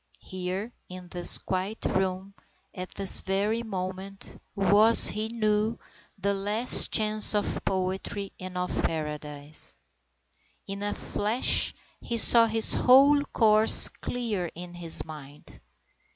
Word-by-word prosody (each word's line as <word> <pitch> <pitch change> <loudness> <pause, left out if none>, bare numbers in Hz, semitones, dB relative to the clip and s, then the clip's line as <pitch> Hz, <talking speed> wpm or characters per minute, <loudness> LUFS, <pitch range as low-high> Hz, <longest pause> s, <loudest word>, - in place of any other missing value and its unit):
Here 185 +5 -7 0.2
in 180 -1 -11
this 175 0 +3
quiet 190 +4 -5
room, 190 +1 -3 0.4
at 185 -1 -8
this 195 -1 +4
very 205 +4 -2
moment, 190 -2 -7
was, 205 +3 +6
he 215 +1 -4
knew, 215 0 -2 0.4
the 200 +1 -2
last 210 +5 +4
chance 215 0 +1
of 205 - -2
poetry 190 +1 -4
and 185 0 -8
of 180 0 -3
paradise. 150 -1 -4 0.9
In 200 0 -8
a 205 0 -4
flash 215 +5 0 0.2
he 235 - -5
saw 230 0 +4
his 225 0 -1
whole 275 +3 +4
course 220 -3 +4
clear 215 -8 -5
in 175 +1 -10
his 170 -2 -2
mind. 145 - -14
195 Hz, 120 wpm, -25 LUFS, 185-215 Hz, 0.9 s, was